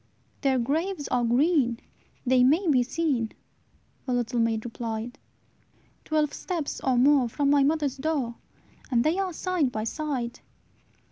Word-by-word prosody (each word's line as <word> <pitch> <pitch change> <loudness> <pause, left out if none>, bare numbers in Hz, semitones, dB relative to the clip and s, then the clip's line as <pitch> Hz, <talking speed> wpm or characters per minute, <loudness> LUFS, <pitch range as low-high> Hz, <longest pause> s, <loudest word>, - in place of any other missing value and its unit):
"Their 270 -2 +2
graves 300 +6 -1
are 245 -1 +1
green, 245 0 +2 0.5
they 255 0 +4
may 320 +9 +3
be 270 -5 +4
seen," 260 -3 -1 0.7
The 255 - 0
little 240 0 -1
maid 225 -1 0
replied, 230 +1 -5 0.9
"Twelve 305 -2 +1
steps 335 -6 -4
or 260 -2 +2
more 265 -1 +4
from 280 +4 +1
my 285 -1 +5
mother's 285 -1 +1
door, 275 -5 -1 0.6
And 240 -3 +2
they 320 +6 +1
are 380 -2 -1
side 345 -5 0
by 215 -2 -3
side. 255 -2 -3
270 Hz, 140 wpm, -26 LUFS, 240-310 Hz, 0.9 s, my